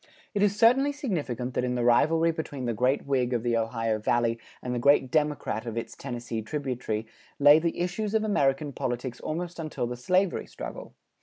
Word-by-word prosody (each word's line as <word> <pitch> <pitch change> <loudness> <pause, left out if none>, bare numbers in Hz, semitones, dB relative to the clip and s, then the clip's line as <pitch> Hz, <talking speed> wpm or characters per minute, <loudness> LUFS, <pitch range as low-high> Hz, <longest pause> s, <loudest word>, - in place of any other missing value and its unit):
It 205 - 0
is 205 -1 +3
certainly 250 +6 +5
significant 145 - -3
that - - 0
in 125 0 -1
the 120 - 0
rivalry 160 +8 +4
between 145 -5 -5
the 120 - 0
great 125 +5 +1
Whig 130 -3 +1
of 120 -2 0
the 120 -1 +1
Ohio 115 -1 0
Valley 115 +1 +1 0.2
and 125 - -4
the 120 - -1
great 135 0 +4
Democrat 150 -6 0
of 115 0 -4
its 115 - -5
Tennessee 120 -3 -5
tributary 120 -3 -3 0.3
lay 145 +2 +7
the 170 +1 -2
issues 200 +5 -2
of 220 - +2
American 145 -8 +1
politics 125 0 -3
almost 175 +2 -4
until 155 -6 -3
the 120 +1 -4
slavery 180 +9 +1
struggle. - - -8
135 Hz, 185 wpm, -27 LUFS, 120-165 Hz, 0.3 s, lay